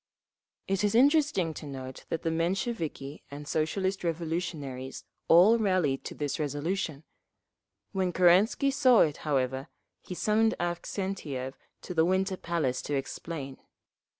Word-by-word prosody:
It 195 +1 0
is 205 +1 +2
interesting 280 - +4
to 150 - -8
note 130 -2 -8
that 165 - -3
the 165 - 0
Mensheviki 165 - -2
and 145 +1 -8
Socialist 190 +6 -1
Revolutionaries 160 -6 -3 0.2
all 195 +8 +7
rallied 185 -10 +1
to - - -6
this 145 0 -3
resolution…. 155 +1 -2 0.9
When 190 -2 0
Kerensky 190 +11 +4
saw 260 -4 +5
it, 150 -2 +2
however, 135 -2 -1 0.3
he 180 - -7
summoned 220 +3 +2
Avksentiev 175 -6 -3 0.3
to 180 - -5
the 160 -2 +3
Winter 190 +2 +1
Palace 165 -8 -1
to 145 - -3
explain. 135 0 -5
170 Hz, 125 wpm, -29 LUFS, 145-195 Hz, 0.9 s, all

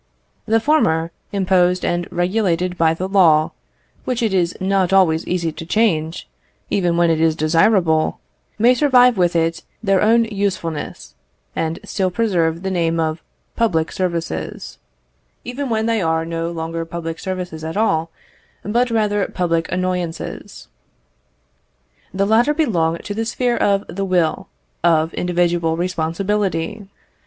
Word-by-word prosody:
The 225 +1 +3
former, 170 - +2 0.2
imposed 185 -2 +2
and 175 0 -1
regulated 180 -1 0
by 165 -1 +2
the 185 +3 -3
law, 165 -6 +4 0.5
which 245 -1 -2
it 220 -4 +1
is 180 -2 +1
not 190 -1 +1
always 175 -4 +3
easy 170 -2 -1
to 160 - -8
change, 165 - 0 0.4
even 175 -3 +1
when 170 -1 +3
it 160 -1 0
is 160 -1 +3
desirable, 165 +1 +2 0.4
may 235 +3 +5
survive 250 -2 +5
with 175 -3 +1
it 165 0 0 0.2
their 195 -2 +2
own 230 +2 +4
usefulness, 195 -7 -4 0.4
and 160 0 -2
still 190 -3 -1
preserve 175 -5 0
the 190 - -2
name 165 -2 0
of 160 0 -1 0.3
public 165 -9 +1
services, 170 - -4 0.6
even 260 +2 -4
when 220 -1 0
they 225 -2 +1
are 160 -1 0
no 165 0 -3
longer 165 0 -4 0.3
services 180 -3 -5
at 160 +4 -4
all, 165 -7 +1 0.5
but 240 +4 +1
rather 210 -3 +1
public 165 -2 -1
annoyances. 180 -2 -4 1.4
The 195 +1 0
latter 235 +8 +3
belong 170 - +1
to 205 - -4
the 225 +2 -2
sphere 245 +1 0
of 200 0 +1
the 195 +2 -4
will, 175 -4 0 0.4
of 165 -1 +3
individual 175 -2 0
responsibility. 185 +2 -2
180 Hz, 135 wpm, -19 LUFS, 165-205 Hz, 1.4 s, may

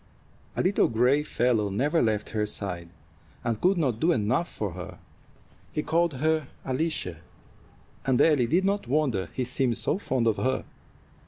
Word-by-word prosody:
A - - 0
little 190 +2 +3
gray 125 +6 +3
fellow 120 -7 +1
never 145 - +1
left 110 -3 0
her 105 -1 0
side, 90 -5 -4 0.5
and 115 -3 -1
could 185 +1 +3
not 130 -9 0
do 165 +2 +3
enough 125 +6 +1
for 105 -3 -3
her. 90 +1 -8 0.7
He 150 - -2
called 170 -2 +1
her 155 +1 +1 0.2
Alicia, 130 - -2 0.9
and 130 -2 +2
Ellie 145 -7 +4
did 180 +8 +2
not 200 -7 0
wonder 125 - 0
he 130 - 0
seemed 125 -1 0
so 180 - -1
fond 130 - 0
of 110 -2 +2
her. 130 +1 0
130 Hz, 160 wpm, -27 LUFS, 110-155 Hz, 0.9 s, Ellie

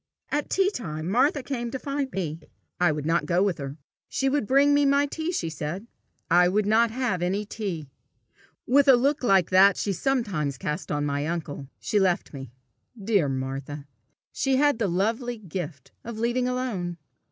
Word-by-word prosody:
At 295 0 -1
tea 390 +1 +2
time 155 - -5
Martha 260 - +2
came 240 -4 -3
to 265 - -4
find 275 0 -3
me. 165 -6 -3 0.4
I 175 -3 +4
would 150 -1 -4
not 165 +2 +1
go 180 +1 +3
with 195 -6 0
her. 140 +1 -6 0.3
She 270 - 0
would 280 -6 0
bring 280 +2 +5
me 290 0 +4
my 280 +1 +4
tea, 320 +4 -3
she 180 - -2
said. 160 +7 -5 0.4
I 175 0 +5
would 205 +2 +1
not 225 +3 +4
have 225 -6 -1
any 195 +4 -1
tea. 190 -8 -5 0.8
With 280 +2 +4
a 265 - +9
look 280 +5 +1
like 195 -8 +3
that 190 +1 +6
she 200 - -1
sometimes 190 - -1
cast 150 +7 -4
on 145 0 0
my 145 +1 -1
uncle, 155 -5 -4
she 210 - 0
left 185 -4 +1
me. 135 -3 -7 0.5
Dear 195 -7 +1
Martha! 135 +2 -4 0.5
she 270 -1 0
had 290 -2 +3
the 215 - +1
lovely 225 +7 -1
gift 170 - -7
of 235 -1 -7
leaving 240 +2 0
alone. 225 -9 -2
200 Hz, 180 wpm, -26 LUFS, 165-255 Hz, 0.8 s, a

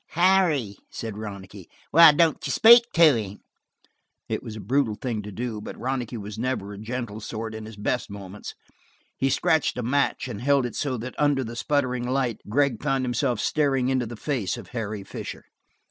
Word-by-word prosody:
"Harry," 170 - +3
said 110 -3 -6
Ronicky, 100 -3 -9 0.2
"why 165 0 +9
don't 155 -1 +2
you - - -2
speak 235 - +7
to 165 -5 +6
him?" 105 -3 -5 0.9
It - - -2
was 110 - -8
a - - -7
brutal 115 +2 0
thing 115 -2 -3
to 105 0 -8
do, 110 0 -4
but - - -8
Ronicky 125 -2 -3
was 105 0 -7
never 115 -5 -2
a 100 - -9
gentle 115 -1 -5
sort 110 +1 -5
in 110 0 -7
his 110 -2 -11
best 110 +4 -2
moments; 100 0 -9 0.6
he 135 - 0
scratched 155 0 +1
a 125 - -2
match 140 +2 0
and 115 -4 -6
held 140 0 +3
it 120 - -5
so 135 -4 -1
that 125 +3 -6
under 145 -2 +2
the 115 0 -7
spluttering 125 -1 -1
light 130 -4 -1
Gregg 135 -1 +1
found 135 -3 0
himself 120 0 0
staring 135 -4 +1
into 130 -3 0
the 120 - -7
face 120 -4 -2
of 110 -6 -10
Harry 110 -4 -4
Fisher. - - -8
120 Hz, 190 wpm, -25 LUFS, 110-140 Hz, 0.9 s, why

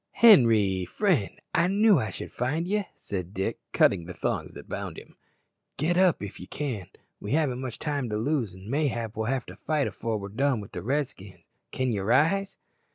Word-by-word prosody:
"Henri, 115 - +6
friend, 155 - 0
I 170 - +3
knew 200 -2 +5
I 110 - -2
should - - -6
find 150 +8 -1
ye," 205 +1 0
said 95 -1 -6
Dick, 95 - -2
cutting 85 -4 +3
the 90 +1 -8
thongs - - -2
that - - -11
bound - - -5
him. - - -12 0.6
"Get 165 +4 +1
up 180 - +3
if 100 - -7
ye 90 - -9
can; 125 - -4 0.3
we 105 - -4
haven't 140 -5 +1
much 130 -3 -5
time 145 -5 -2
to 105 - -1
lose, 115 -4 -1
an' 95 +2 -12
mayhap 120 -5 -1
we'll 110 0 -2
have 130 0 -1
to - - -10
fight 155 -3 0
afore 115 -2 -2
we're 100 -1 -6
done 130 +3 +1
wi' 100 - -8
the - - -5
Redskins. 125 -7 -3 0.3
Can 130 -1 0
ye 105 - -1
rise?" 165 - +2
125 Hz, 195 wpm, -27 LUFS, 105-155 Hz, 0.6 s, Henri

